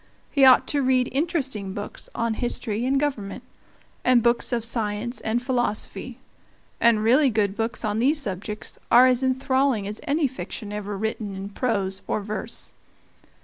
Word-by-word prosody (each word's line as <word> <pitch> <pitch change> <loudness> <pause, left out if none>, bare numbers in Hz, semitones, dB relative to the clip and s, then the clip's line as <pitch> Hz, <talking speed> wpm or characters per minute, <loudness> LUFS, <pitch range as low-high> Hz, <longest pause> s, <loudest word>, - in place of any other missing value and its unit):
He 275 -2 +5
ought 260 -1 +7
to 285 - +1
read 255 -1 +2
interesting 265 - -2
books 205 +1 -7
on 230 -1 0
history 235 -1 -1
and 270 +1 +2
government, 260 -9 -3 0.6
and 250 -2 +4
books 235 +2 +2
of 235 -2 0
science 225 +1 -2
and 235 +2 -1
philosophy; 245 -4 -2 0.6
and 230 -2 +4
really 260 +5 +5
good 205 -3 0
books 230 +1 -2
on 210 0 -1
these 285 +6 +3
subjects 210 -3 -5
are 245 +2 +8
as 255 -1 +3
enthralling 260 -3 +1
as 210 +1 -6
any 290 +1 +2
fiction 225 -4 -7
ever 205 -1 -4
written 215 -1 -3
in 195 +1 -6
prose 200 -4 -1
or - - 0
verse. 215 +2 -5
235 Hz, 155 wpm, -24 LUFS, 210-260 Hz, 0.6 s, are